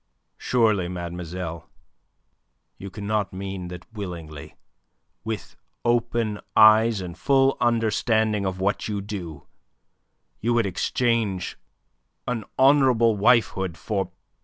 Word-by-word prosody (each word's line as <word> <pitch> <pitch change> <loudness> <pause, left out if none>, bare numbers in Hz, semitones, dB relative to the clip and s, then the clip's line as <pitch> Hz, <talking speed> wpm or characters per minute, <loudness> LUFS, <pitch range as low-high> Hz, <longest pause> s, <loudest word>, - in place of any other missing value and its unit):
"Surely, 110 -7 +2
mademoiselle, 85 -1 -6 1.1
you 100 - -7
cannot 105 +1 -2
mean 95 -1 -5
that 90 0 -9
willingly, 85 -8 -7 0.7
with 110 -2 -5 0.3
open 120 -3 0 0.2
eyes 110 0 +6
and 90 -2 -6
a - - -18
full 135 -1 +3
understanding 110 -2 +1
of 95 -1 -3
what 100 +2 -1
you 105 -2 -2
do, 95 -8 -7 0.9
you 120 +2 0
would 115 -2 +2
exchange 105 0 -1 0.7
an 125 -3 -2
honourable 130 -5 +5
wifehood 100 -5 +2
for... 100 +2 -3
105 Hz, 105 wpm, -24 LUFS, 90-115 Hz, 1.1 s, eyes